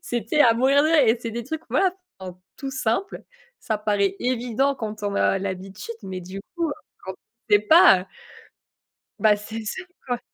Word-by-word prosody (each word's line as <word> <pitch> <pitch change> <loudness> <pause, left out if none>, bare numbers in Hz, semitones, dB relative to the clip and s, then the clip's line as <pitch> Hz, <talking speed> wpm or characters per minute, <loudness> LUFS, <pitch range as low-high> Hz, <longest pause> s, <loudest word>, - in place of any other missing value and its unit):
c'était 240 +5 -1
à 235 -5 +6
mourir 270 +4 +4
de - - +3
rire 320 -2 +5
et 230 +2 +3
c'est 230 -2 -5
des 235 +1 -4
trucs, 315 +5 -5
voilà, 375 -2 +2 0.3
enfin, 185 -1 -8 0.2
tout 270 -1 -5
simples. 260 - -2 0.4
Ça 220 - -2
paraît 205 -2 0
évident 250 +2 0
quand 215 -2 -6
on 200 -1 -2
a 195 - +2
l'habitude, 195 +3 -6
mais 185 -1 -5
du 185 +2 -8 0.2
coup, 335 -3 0 0.3
quand 190 - -5
on 225 +2 -3
sait - - +7
pas, 315 - +6
heu - - -9 1.1
Bah, 215 -1 +4
c'est 220 +2 -7
ça 230 - -5 0.2
quoi. 245 -1 -2
225 Hz, 185 wpm, -23 LUFS, 200-265 Hz, 1.1 s, sait